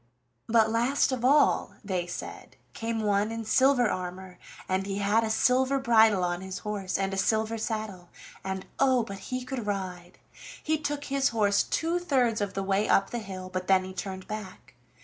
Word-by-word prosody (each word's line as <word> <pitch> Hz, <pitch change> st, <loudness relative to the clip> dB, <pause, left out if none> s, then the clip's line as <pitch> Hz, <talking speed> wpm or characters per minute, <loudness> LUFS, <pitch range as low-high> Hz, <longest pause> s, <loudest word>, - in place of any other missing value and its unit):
"But 220 Hz, -1 st, +3 dB
last 240 Hz, +5 st, +2 dB
of 255 Hz, -2 st, -3 dB
all," 285 Hz, +3 st, +3 dB
they 185 Hz, -3 st, -2 dB
said, 175 Hz, -, -8 dB, 0.2 s
"came 225 Hz, -1 st, -3 dB
one 205 Hz, +1 st, +1 dB
in 225 Hz, 0 st, -5 dB
silver 260 Hz, +1 st, +4 dB
armor, 185 Hz, -1 st, -5 dB, 0.3 s
and 190 Hz, +1 st, -1 dB
he 195 Hz, 0 st, -3 dB
had 205 Hz, +3 st, +2 dB
a 220 Hz, -, -1 dB
silver 260 Hz, +4 st, +2 dB
bridle 225 Hz, -6 st, +4 dB
on 175 Hz, 0 st, -1 dB
his 190 Hz, 0 st, -6 dB
horse, 200 Hz, -3 st, -2 dB
and 195 Hz, 0 st, -1 dB
a -, -, -3 dB
silver 220 Hz, +3 st, 0 dB
saddle, 215 Hz, -6 st, -4 dB, 0.3 s
and 190 Hz, 0 st, -4 dB
oh, 260 Hz, -3 st, +4 dB
but 200 Hz, -3 st, -7 dB
he 255 Hz, 0 st, -3 dB
could 250 Hz, -4 st, -5 dB
ride! 185 Hz, -3 st, -4 dB, 0.5 s
He 315 Hz, 0 st, 0 dB
took 290 Hz, -1 st, -3 dB
his 275 Hz, -1 st, +1 dB
horse 205 Hz, -3 st, +2 dB
two 335 Hz, +2 st, -1 dB
thirds 250 Hz, -10 st, +1 dB
of 200 Hz, -1 st, -3 dB
the 195 Hz, -, -1 dB
way 195 Hz, +2 st, 0 dB
up 195 Hz, -, +3 dB
the 240 Hz, -, -2 dB
hill, 190 Hz, -3 st, -7 dB
but 185 Hz, 0 st, -4 dB
then 190 Hz, -1 st, +4 dB
he 185 Hz, 0 st, -8 dB
turned 190 Hz, 0 st, -6 dB
back. 195 Hz, -10 st, -8 dB
210 Hz, 190 wpm, -28 LUFS, 190-245 Hz, 0.5 s, silver